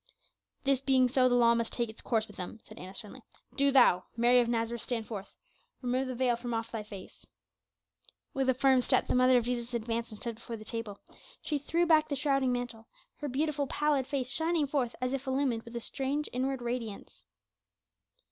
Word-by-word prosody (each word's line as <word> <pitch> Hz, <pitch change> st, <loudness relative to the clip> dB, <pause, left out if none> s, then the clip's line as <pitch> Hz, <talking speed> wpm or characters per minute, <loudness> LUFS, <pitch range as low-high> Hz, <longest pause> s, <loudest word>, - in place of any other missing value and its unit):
"This 275 Hz, -1 st, +2 dB
being 260 Hz, -2 st, +4 dB
so, 255 Hz, 0 st, +3 dB
the 245 Hz, -, +3 dB
law 235 Hz, -1 st, +5 dB
must 230 Hz, -1 st, -1 dB
take 240 Hz, -1 st, -1 dB
its 220 Hz, 0 st, -10 dB
course 220 Hz, -2 st, 0 dB
with -, -, -14 dB
them," 185 Hz, +2 st, -6 dB
said -, -, -13 dB
Annas 185 Hz, +2 st, -8 dB
sternly. 210 Hz, -3 st, -8 dB, 0.3 s
"Do 280 Hz, 0 st, +4 dB
thou, 240 Hz, -9 st, +5 dB
Mary 240 Hz, +2 st, +5 dB
of 240 Hz, -, +2 dB
Nazareth, 230 Hz, 0 st, -1 dB
stand 230 Hz, -3 st, -3 dB
forth. 205 Hz, -3 st, -8 dB, 0.5 s
Remove 255 Hz, +2 st, 0 dB
the 255 Hz, -, -4 dB
veil 245 Hz, -1 st, +2 dB
from 240 Hz, 0 st, -4 dB
off 225 Hz, +1 st, -3 dB
thy 225 Hz, -3 st, -3 dB
face." 205 Hz, -3 st, -11 dB, 1.1 s
With 270 Hz, -1 st, 0 dB
a 260 Hz, -, +3 dB
firm 265 Hz, 0 st, +4 dB
step 255 Hz, +1 st, +2 dB
the -, -, -1 dB
mother 255 Hz, 0 st, +5 dB
of 240 Hz, -, +1 dB
Jesus 240 Hz, 0 st, -2 dB
advanced 230 Hz, 0 st, -2 dB
and 215 Hz, -, -9 dB
stood 235 Hz, -, -3 dB
before 235 Hz, 0 st, -7 dB
the 215 Hz, -, -11 dB
table; 225 Hz, -3 st, -4 dB, 0.5 s
she 295 Hz, -2 st, -1 dB
threw 335 Hz, +5 st, +1 dB
back 310 Hz, -2 st, +4 dB
the 285 Hz, -, 0 dB
shrouding 275 Hz, -2 st, +1 dB
mantle, 240 Hz, -2 st, -4 dB, 0.3 s
her 295 Hz, -, -4 dB
beautiful, 290 Hz, +1 st, 0 dB
pallid 290 Hz, -3 st, +1 dB
face 265 Hz, -2 st, -2 dB
shining 320 Hz, +1 st, +1 dB
forth 270 Hz, -4 st, -1 dB
as 255 Hz, +1 st, -1 dB
if 275 Hz, 0 st, -3 dB
illumined 260 Hz, -3 st, +1 dB
with 230 Hz, +1 st, -12 dB
a -, -, -1 dB
strange 275 Hz, +5 st, -2 dB
inward 260 Hz, 0 st, -1 dB
radiance. 235 Hz, -4 st, -5 dB
250 Hz, 205 wpm, -30 LUFS, 230-270 Hz, 1.1 s, law